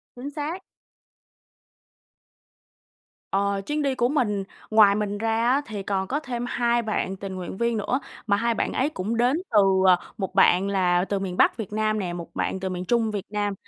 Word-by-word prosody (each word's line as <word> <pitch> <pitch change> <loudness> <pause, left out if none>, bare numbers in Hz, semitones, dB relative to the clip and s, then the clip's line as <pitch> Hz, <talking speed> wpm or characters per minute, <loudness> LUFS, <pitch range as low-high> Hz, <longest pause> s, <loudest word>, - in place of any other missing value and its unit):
Chính 260 +4 -6
xác. 315 +6 -4 2.7
Ờ. 200 0 +1
Chuyến 300 0 -1
đi 275 -2 0
của 240 - +2
mình, 210 -9 0 0.3
ngoài 210 -2 +6
mình 205 -1 -2
ra 225 +2 +1
á 275 +3 +3
thì 205 -3 -6
còn 190 -1 -1
có 280 +7 -1
thêm 245 -5 -4
2 240 0 +1
bạn 215 -3 -2
tình 195 -1 -6
nguyện 185 0 -6
viên 235 0 0
nữa, 250 +6 0 0.3
mà 200 0 +3
2 235 +1 +1
bạn - - -2
ấy 275 +4 +1
cũng 220 -2 -3
đến 250 +6 +3
từ, 215 - +5 0.3
à, 180 -1 +7 0.2
một 190 -1 -4
bạn 190 0 +5
là 180 -2 +2
từ 200 0 -1
miền 185 -2 -4
Bắc - - +4
Việt 210 -3 -6
Nam 215 0 0
nè, 180 -3 -3
một 170 -1 -7
bạn 190 - -1
từ 190 - -3
miền 180 0 -4
Trung 230 -1 +1
Việt 205 -2 -4
Nam, 205 -1 -1
210 Hz, 195 wpm, -25 LUFS, 195-240 Hz, 2.7 s, à